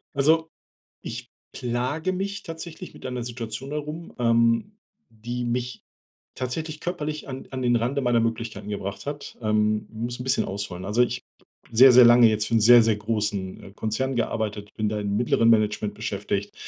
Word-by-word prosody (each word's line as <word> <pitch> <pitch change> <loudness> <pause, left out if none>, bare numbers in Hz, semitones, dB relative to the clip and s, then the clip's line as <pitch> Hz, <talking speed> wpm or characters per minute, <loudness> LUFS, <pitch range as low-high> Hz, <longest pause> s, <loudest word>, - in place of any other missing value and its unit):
Also, 160 +3 +3 0.6
ich - - -7 0.2
plage 125 +9 -2
mich 200 +2 -3
tatsächlich 165 +1 -8
mit - - -9
einer 125 -1 -3
Situation 120 +2 -6
herum, 150 +3 -5
ähm, 115 - +2 0.4
die 120 +2 -5
mich 120 0 -2 0.6
tatsächlich 155 +5 -4
körperlich 155 -4 -4
an 130 -1 -7
an 130 -1 -4
den 120 -1 +3
Rande 125 +5 0
meiner 120 -2 +3
Möglichkeiten 115 -3 -3
gebracht 100 +1 -5
hat, 145 0 -6
ähm, 105 -1 +1
muss 120 +2 -5
'n - - -4
bisschen 130 0 +1
ausholen. 95 -2 -5
Also, 105 +5 +2
ich 125 - -1 0.5
sehr, 130 +4 +8
sehr 125 0 +9
lange 120 0 +8
jetzt 110 -1 0
für 115 - -1
'n 115 - +4
sehr, 120 +2 +8
sehr 110 -1 +2
großen, 105 -3 -2
äh, - - -11
Konzern 110 +6 -2
gearbeitet. 105 -3 -2
Bin 110 -1 -1
da 105 0 -2
im 100 0 -1
mittleren 115 0 +3
Management 105 -2 +2
beschäftigt, - - -3
120 Hz, 170 wpm, -25 LUFS, 110-135 Hz, 0.6 s, sehr